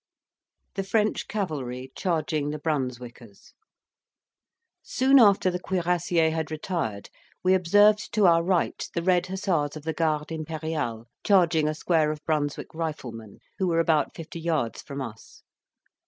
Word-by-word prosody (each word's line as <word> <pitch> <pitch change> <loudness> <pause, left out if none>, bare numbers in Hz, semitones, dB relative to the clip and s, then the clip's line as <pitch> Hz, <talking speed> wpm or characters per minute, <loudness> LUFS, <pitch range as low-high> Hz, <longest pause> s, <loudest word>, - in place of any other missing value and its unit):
THE 195 - -2
FRENCH 210 +2 0
CAVALRY 135 - -4
CHARGING 155 -4 -1
THE 150 - -3
BRUNSWICKERS 125 -7 -5 1.3
Soon 265 +1 +4
after 200 -4 +5
the 180 - -3
cuirassiers 175 -3 +1
had 160 -1 -2
retired, 155 - -4 0.3
we 185 +1 +4
observed 205 +4 +4
to 210 -2 +3
our 170 -1 +5
right 175 0 0
the 170 - -1
red 180 0 +2
hussars 185 -6 -1
of 150 - -10
the 160 +1 -2
Garde 155 -1 -1
Imperiale 155 -7 -4 0.2
charging 170 -6 +3
a 155 - -1
square 160 -1 +1
of 155 0 -8
Brunswick 145 -2 -2
riflemen, 125 -10 -6 0.2
who 190 - +1
were 165 -1 +2
about 160 -2 +1
fifty 165 +1 -8
yards 160 -8 -1
from 140 -1 -7
us. 110 -3 -11
160 Hz, 140 wpm, -26 LUFS, 145-180 Hz, 1.3 s, after